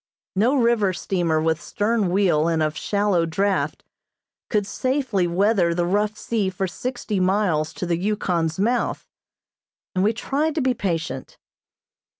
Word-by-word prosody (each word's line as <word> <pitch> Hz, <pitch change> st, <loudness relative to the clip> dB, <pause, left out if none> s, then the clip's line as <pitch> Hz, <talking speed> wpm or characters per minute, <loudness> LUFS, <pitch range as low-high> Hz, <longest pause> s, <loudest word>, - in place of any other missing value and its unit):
No 230 Hz, +8 st, +3 dB
river 230 Hz, -6 st, +3 dB
steamer 175 Hz, -3 st, 0 dB
with 160 Hz, +1 st, 0 dB
stern 215 Hz, -1 st, 0 dB
wheel 175 Hz, -5 st, +2 dB
and 165 Hz, -2 st, +1 dB
of 155 Hz, 0 st, -1 dB
shallow 200 Hz, -5 st, +1 dB
draught, 195 Hz, +4 st, 0 dB, 0.7 s
could 210 Hz, -2 st, +1 dB
safely 255 Hz, -5 st, 0 dB
weather 180 Hz, -1 st, +2 dB
the 175 Hz, 0 st, +1 dB
rough 210 Hz, +4 st, 0 dB
sea 215 Hz, -4 st, -1 dB
for 190 Hz, +1 st, -2 dB
sixty 220 Hz, +1 st, -3 dB
miles 185 Hz, -5 st, +1 dB
to -, -, -4 dB
the 170 Hz, -1 st, 0 dB
Yukon's 175 Hz, -4 st, -1 dB
mouth, 235 Hz, +5 st, 0 dB, 0.9 s
and 185 Hz, -, +1 dB
we 210 Hz, -, +4 dB
tried 290 Hz, +7 st, -1 dB
to 315 Hz, -, +1 dB
be 260 Hz, -1 st, +2 dB
patient. 165 Hz, -, -3 dB
195 Hz, 145 wpm, -23 LUFS, 170-215 Hz, 0.9 s, we